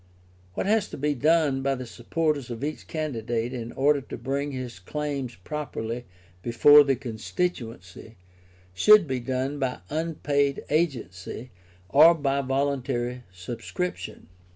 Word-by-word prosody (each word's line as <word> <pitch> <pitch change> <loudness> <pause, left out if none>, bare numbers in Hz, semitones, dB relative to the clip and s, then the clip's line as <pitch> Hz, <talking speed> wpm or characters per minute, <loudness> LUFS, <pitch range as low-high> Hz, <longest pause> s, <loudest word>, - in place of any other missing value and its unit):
What - - -1
has 215 +1 +2
to - - -7
be 150 +1 0
done 150 -1 +2
by 135 0 +1
the 130 -1 -6
supporters 140 +3 -2
of 120 +2 -6
each 150 +1 -4
candidate 120 -6 -2
in 120 -2 -5
order 145 +1 +3
to - - -8
bring 140 +2 -2
his 125 -6 -6
claims 140 +3 -4
properly 120 0 -5 0.4
before 145 +7 +7
the 135 -1 +2
constituency, 115 - -4 0.6
should 210 - +7
be 130 -2 -1
done 130 +3 -2
by 130 -7 -2
unpaid 150 -3 0
agency 125 - -2 0.4
or 155 - +7
by 140 -2 0
voluntary 130 -2 -1
subscription. 115 - -5
135 Hz, 130 wpm, -26 LUFS, 120-150 Hz, 0.6 s, before